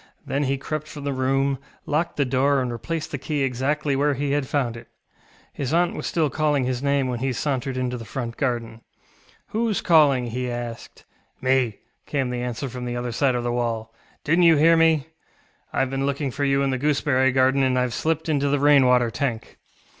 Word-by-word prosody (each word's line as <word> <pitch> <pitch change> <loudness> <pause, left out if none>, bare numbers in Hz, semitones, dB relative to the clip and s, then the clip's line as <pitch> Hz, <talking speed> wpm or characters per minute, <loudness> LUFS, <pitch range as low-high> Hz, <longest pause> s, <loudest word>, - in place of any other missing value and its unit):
Then 140 +1 -1
he 135 +1 0
crept 155 +2 -4
from 145 -2 -9
the 140 -1 -1
room, 135 +1 0 0.3
locked 160 +3 -1
the 140 - +2
door, 135 +2 +2
and 125 -2 -2
replaced 155 +7 -4
the 140 - -4
key 145 +1 -2
exactly 135 +3 0
where 145 +1 +1
he 140 +1 -2
had 145 -2 0
found 125 -5 -1
it. 115 - -11 0.7
His 140 +3 -2
aunt 175 0 +2
was - - -4
still 160 -3 +1
calling 150 -3 +1
his 125 0 -2
name 140 -1 +1
when 125 -2 -3
he 135 +2 -1
sauntered 135 0 -2
into 125 -1 -2
the - - -7
front 115 +1 -5
garden. 120 -4 -2 0.7
ŌĆ£WhoŌĆÖs 220 -2 0
calling? 145 -7 +4
ŌĆØ - - -5
he 125 +2 -3
asked. 120 -1 -7 0.4
ŌĆ£Me, 130 - -1
ŌĆØ 115 -5 -4 0.3
came 135 -4 -1
the 125 0 -3
answer 125 +3 -3
from 125 0 -6
the 120 0 -3
other 120 0 -3
side 130 +2 +1
of 120 - -1
the 120 - -1
wall; 115 -2 -2 0.3
ŌĆ£didnŌĆÖt 165 +4 +3
you 165 -1 +7
hear 165 +3 +5
me? 160 -3 +3 0.7
IŌĆÖve 135 -1 0
been 135 0 -1
looking 140 -1 -2
for 145 +3 -2
you 135 0 +2
in 135 - +1
the 130 - -1
gooseberry 140 -2 +2
garden, 130 +1 +3
and 130 -1 +2
IŌĆÖve 125 -1 +1
slipped 160 +5 -1
into 145 -3 +1
the 145 - +2
rain 145 -2 +5
water 125 -2 +3
tank. 115 -3 -4
135 Hz, 215 wpm, -23 LUFS, 125-145 Hz, 0.7 s, you